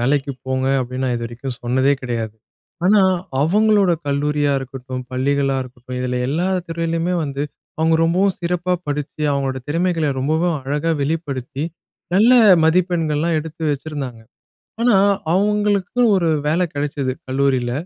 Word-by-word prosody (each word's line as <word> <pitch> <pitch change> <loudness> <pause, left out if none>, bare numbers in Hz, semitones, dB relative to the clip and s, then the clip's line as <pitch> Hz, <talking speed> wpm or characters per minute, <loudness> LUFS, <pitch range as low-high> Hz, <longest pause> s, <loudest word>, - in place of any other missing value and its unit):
வேலைக்கு 140 +2 +1
போங்க 130 0 0
அப்டின்னு 130 +1 -3
நான் 125 -1 0
இதுவரைக்கும் 120 +2 -5
சொன்னதே 130 +3 +2
கிடையாது. 115 -3 -3 0.5
ஆனா 205 +2 +5 0.4
அவுங்களோட 200 +3 +3
கல்லூரியா 145 0 +1
இருக்கட்டும், 130 -1 -6
பள்ளிகளா 135 +1 +1
இருக்கட்டும். 125 0 -9
இதுல 125 0 -1
எல்லா 170 +6 0 0.2
துறையிலேயுமே 165 +1 -1
வந்து 140 0 -3 0.4
அவுங்க 160 0 +3
ரொம்பவும் 185 +3 +2
சிறப்பாக 180 +1 0
படிச்சு 145 +1 -4
அவுங்களோட 135 -1 -1
திறமைகள 165 0 0
ரொம்பவும் 160 +4 +1
அழகா 145 +4 -1
வெளிப்படுத்தி 140 -3 -3 0.5
நல்ல 225 +6 +6 0.3
மதிப்பெண்கள்லாம் 165 -2 +1
எடுத்து 160 +1 -8
வச்சிருந்தாங்க. 140 -5 -5 0.6
ஆனா, 240 -3 +4 0.4
அவுங்களுக்குன்னு 210 +3 +2
ஒரு 170 -3 +1 0.2
வேலை 165 +4 +2
கிடைச்சது 145 -2 -2 0.2
கல்லூரில. 130 -2 +1
145 Hz, 120 wpm, -20 LUFS, 130-170 Hz, 0.6 s, நல்ல